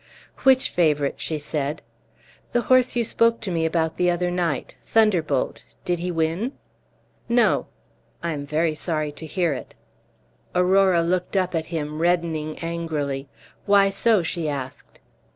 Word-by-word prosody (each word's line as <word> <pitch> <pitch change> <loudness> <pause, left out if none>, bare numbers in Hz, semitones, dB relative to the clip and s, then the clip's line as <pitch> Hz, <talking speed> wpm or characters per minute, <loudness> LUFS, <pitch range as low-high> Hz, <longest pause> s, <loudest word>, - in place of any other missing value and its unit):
"Which 265 -1 +4
favorite?" 150 -5 +1
she 160 - -2
said. 150 0 -3 0.7
"The 240 - +3
horse 255 0 +3
you 235 -1 +1
spoke 230 +1 +2
to 205 -5 -4
me 165 -1 +1
about 160 -1 -1
the 180 0 +3
other 175 0 0
night 170 -6 -2
Thunderbolt; 175 -11 +1 0.2
did 175 -1 0
he 180 +1 -3
win?" 170 - -1 0.8
"No." 240 0 +3 0.6
"I 170 - -1
am 145 -1 -5
very 155 +2 +1
sorry 155 -1 -2
to 160 +2 -9
hear 170 -1 0
it." 130 - -8 0.8
Aurora 180 -1 +4
looked 180 +3 -1
up 185 -1 +1
at 160 -1 -1
him, 155 -2 -4
reddening 165 -3 0
angrily. 150 -5 -3 0.4
"Why 200 -1 +5
so?" 205 -1 +2
she 165 -1 -2
asked. 135 -3 -7
170 Hz, 145 wpm, -23 LUFS, 155-185 Hz, 0.8 s, Why